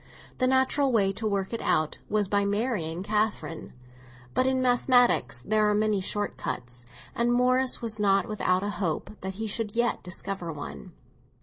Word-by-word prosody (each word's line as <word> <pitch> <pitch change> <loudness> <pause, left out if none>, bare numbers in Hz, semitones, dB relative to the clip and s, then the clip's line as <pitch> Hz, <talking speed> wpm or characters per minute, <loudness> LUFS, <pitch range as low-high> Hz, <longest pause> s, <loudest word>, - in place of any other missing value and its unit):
The 255 - +3
natural 265 +1 +2
way 200 -5 +3
to 215 +3 -3
work 200 0 -2
it 230 - -3
out 155 -1 0
was 210 -1 +1
by 200 +1 +1
marrying 200 -5 -1
Catherine; 210 -5 -2 0.6
but 255 - +2
in 260 0 +1
mathematics 245 - +3
there 215 0 +2
are 210 - +2
many 210 -2 +1
short 205 +2 -2
cuts, 120 0 -5 0.3
and 235 +1 +1
Morris 255 +1 +2
was 220 -2 -1
not 195 +1 +3
without 190 -4 0
a 205 - -1
hope 165 -5 -2
that 190 0 -5
he 220 +3 -4
should 215 0 -3
yet 240 0 +1
discover 180 0 -4
one. 150 -2 -8
210 Hz, 170 wpm, -27 LUFS, 190-240 Hz, 0.6 s, The